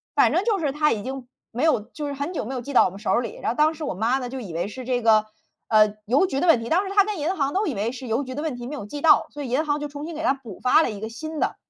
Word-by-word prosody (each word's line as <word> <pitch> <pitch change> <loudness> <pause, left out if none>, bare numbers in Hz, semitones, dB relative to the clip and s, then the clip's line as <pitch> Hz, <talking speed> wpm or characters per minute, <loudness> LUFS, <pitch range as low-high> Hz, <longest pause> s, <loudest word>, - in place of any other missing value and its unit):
反 - - +4
正 365 - +2
就 425 -4 +1
是 285 -4 -1
它 300 0 +2
已 210 - -1
经 260 +1 -6 0.2
没 245 +6 -2
有 315 -8 +4
就 290 +7 -8
是 285 - -3
很 285 +6 -4
久 325 - -2
没 265 - -5
有 - - -2
寄 280 +3 -7
到 - - +7
我 - - +1
们 195 +2 -11
手 205 - -1
儿 235 - +3
里， 235 - -7
然 - - -1
后 240 - -1
当 310 +1 +3
时 315 -1 -6
我 - - -2
妈 230 +7 +1
呢， 250 -2 -4
就 260 0 -6
以 190 -6 -7
为 170 +4 -2
是 255 +5 -8
这 245 -1 -1
个， 215 -1 +5 0.4
呃， 215 -1 +4
邮 270 - +3
局 275 -7 -2
的 355 - 0
问 325 -8 +6
题， 230 - -6
当 375 +4 +2
时 390 - -5
她 400 - +7
跟 415 -3 -4
银 330 +6 -1
行 275 -3 -1
都 400 +1 +1
以 275 - -2
为 210 +4 -1
是 260 -1 -8
邮 230 +5 0
局 260 - -7
的 290 - -4
问 310 -5 -2
题 240 0 -7
没 295 - -6
有 205 - -6
寄 290 +6 -6
到， 325 - +5
所 290 -1 -7
以 255 - -5
银 275 +6 +1
行 295 -1 0
就 295 - -3
重 290 +1 -7
新 335 - -7
给 320 - -5
她 300 - +3
补 245 -8 -11
发 255 +5 +4
了 - - +1
一 210 -3 -6
个 220 - -4
新 310 +7 -6
的。 - - 0
270 Hz, 390 characters per minute, -24 LUFS, 230-310 Hz, 0.4 s, 到